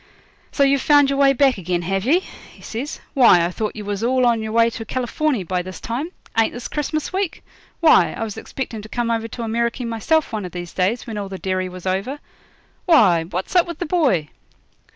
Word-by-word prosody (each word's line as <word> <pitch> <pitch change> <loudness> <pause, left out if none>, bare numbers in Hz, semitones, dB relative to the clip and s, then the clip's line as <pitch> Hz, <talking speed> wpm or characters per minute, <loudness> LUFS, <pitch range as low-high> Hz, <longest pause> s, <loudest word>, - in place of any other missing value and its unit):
'So 280 - +2
you've 275 -1 +3
found 290 -2 +5
your 275 - -1
way 275 -1 +6
back 270 -4 +3
again, 175 -1 -2
have 195 +3 -1
ye?' 330 +8 +3 0.3
he - - -18
says. 255 +7 -5
'Why, 235 - +6
I 175 - -2
thought 215 +3 -3
you 210 -2 -7
was 205 +1 -3
all 255 +1 +2
on 235 -2 +2
your 220 0 -4
way 230 +1 +3
to 225 - -6
Californy 255 +1 -1
by 180 +1 -1
this 185 +1 -8
time. 260 +8 -4 0.3
Ain't 225 0 +2
this 245 - -6
Christmas 310 +3 -3
week? 380 -3 -2 0.4
Why, 325 - +5
I - - -4
was 215 -2 -5
expecting 235 -5 -6
to 215 - -11
come 240 0 -1
over 225 0 -1
to 235 +1 -6
Ameriky 235 +2 -1
myself 235 +6 0
one 215 -2 -2
of 180 - -7
these 175 -1 -7
days, 195 +6 0
when 220 -3 -5
all 200 -1 -5
the 190 - -6
derry 185 0 -2
was 180 0 -10
over 195 +9 -1 0.7
Why, 190 - +5
what's 185 - -5
up 350 -1 +5
with 340 -2 -6
the 350 - -3
boy?' 275 - +1
230 Hz, 220 wpm, -21 LUFS, 190-275 Hz, 0.7 s, way